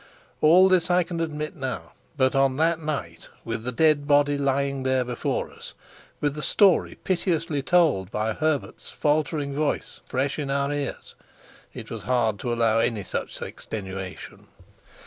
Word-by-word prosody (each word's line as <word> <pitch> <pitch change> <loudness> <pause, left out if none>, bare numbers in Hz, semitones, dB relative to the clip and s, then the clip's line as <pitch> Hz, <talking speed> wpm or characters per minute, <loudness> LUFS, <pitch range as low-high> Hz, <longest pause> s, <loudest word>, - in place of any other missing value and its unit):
All 175 +5 +7
this 185 -2 +3
I 180 0 +4
can 170 -1 -5
admit 155 -1 -3
now, 130 -5 -5 0.3
but 130 0 +3
on 135 -1 +3
that 165 +1 +2
night, 115 - -4 0.2
with 115 -1 -3
the 125 - -2
dead 150 +1 +3
body 145 0 +4
lying 140 -1 0
there 130 -1 +1
before 120 -1 -2
us, - - -12 0.4
with 145 -1 0
the 150 - -6
story 195 +2 +3
piteously 165 -5 0
told 145 - +3
by 110 +1 -1
Herbert's 155 +2 -2
faltering 150 -1 0
voice 150 +1 -2
fresh 135 +4 -1
in 145 -2 -3
our 140 +1 0
ears, 145 -1 -4 0.6
it - - -9
was - - -5
hard 115 -5 +1
to 120 - -3
allow 115 -1 +2
any 115 -3 0
such - - -5
extenuation. 95 -3 -7
140 Hz, 155 wpm, -25 LUFS, 125-155 Hz, 0.6 s, All